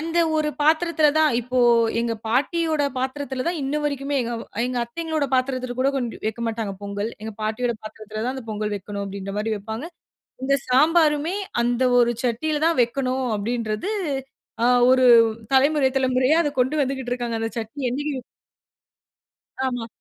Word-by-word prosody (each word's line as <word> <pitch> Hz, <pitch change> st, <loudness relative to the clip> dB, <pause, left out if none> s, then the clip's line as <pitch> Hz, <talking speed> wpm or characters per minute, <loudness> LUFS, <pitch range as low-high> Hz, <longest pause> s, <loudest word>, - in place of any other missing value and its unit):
அந்த 330 Hz, +2 st, -1 dB, 0.2 s
ஒரு 305 Hz, -1 st, +1 dB
பாத்திரத்தில 315 Hz, 0 st, +3 dB
தான் 310 Hz, -2 st, +4 dB
இப்போ 250 Hz, +2 st, -2 dB, 0.4 s
எங்க 235 Hz, -1 st, -1 dB
பாட்டியோட 310 Hz, +5 st, +1 dB, 0.2 s
பாத்திரத்தில 265 Hz, 0 st, -3 dB
தான் 345 Hz, -1 st, -2 dB
இன்னு 280 Hz, +3 st, -1 dB
வரைக்குமே, 280 Hz, -1 st, -1 dB, 0.2 s
அ -, -, -3 dB, 0.3 s
எங்க 250 Hz, -1 st, -2 dB
அத்தைங்களோடய 310 Hz, +2 st, -3 dB
பாத்திரத்தில 255 Hz, -1 st, -1 dB
கூட 270 Hz, -, +3 dB
கொஞ்சம் 245 Hz, -4 st, -4 dB
வைக்க 220 Hz, +2 st, -3 dB
மாட்டாங்க. 220 Hz, -3 st, -3 dB
பொங்கல் 205 Hz, +2 st, -3 dB
எங்க 220 Hz, 0 st, -5 dB
பாட்டியோட 235 Hz, +3 st, -1 dB
பாத்திரத்தில 215 Hz, 0 st, -7 dB
தான் 255 Hz, +2 st, -1 dB
அந்த 260 Hz, -, -7 dB
பொங்கல் 210 Hz, 0 st, -2 dB
வைக்கணும் 200 Hz, +1 st, -5 dB
அப்படின்ற 195 Hz, 0 st, -6 dB
மாரி 220 Hz, +1 st, -1 dB
வப்பாங்க. 220 Hz, +7 st, -6 dB, 0.6 s
இந்த 275 Hz, +1 st, +3 dB
சாம்பாருமே 305 Hz, +4 st, +3 dB, 0.3 s
அந்த 245 Hz, +1 st, +1 dB, 0.2 s
ஒரு 240 Hz, 0 st, +3 dB
சட்டில 295 Hz, +6 st, -1 dB
தான் 330 Hz, -6 st, +1 dB
வைக்கணும் 255 Hz, +2 st, -1 dB
அப்படின்றது 225 Hz, -, -2 dB, 0.7 s
அ -, -, +5 dB, 0.3 s
ஒரு 255 Hz, 0 st, +5 dB, 0.5 s
தலைமுறை 280 Hz, 0 st, +4 dB
தலைமுறையா 260 Hz, +3 st, +3 dB
அத 295 Hz, -, +1 dB
கொண்டு 260 Hz, +5 st, 0 dB
வந்துகிட்டு 265 Hz, -2 st, -4 dB
இருக்காங்க. 240 Hz, -2 st, -3 dB
அந்த 225 Hz, -, -2 dB
சட்னி 225 Hz, +6 st, -7 dB
என்னிக்கு 285 Hz, 0 st, -3 dB, 1.5 s
ஆமா. 245 Hz, -3 st, -3 dB
255 Hz, 150 wpm, -23 LUFS, 230-290 Hz, 1.5 s, அ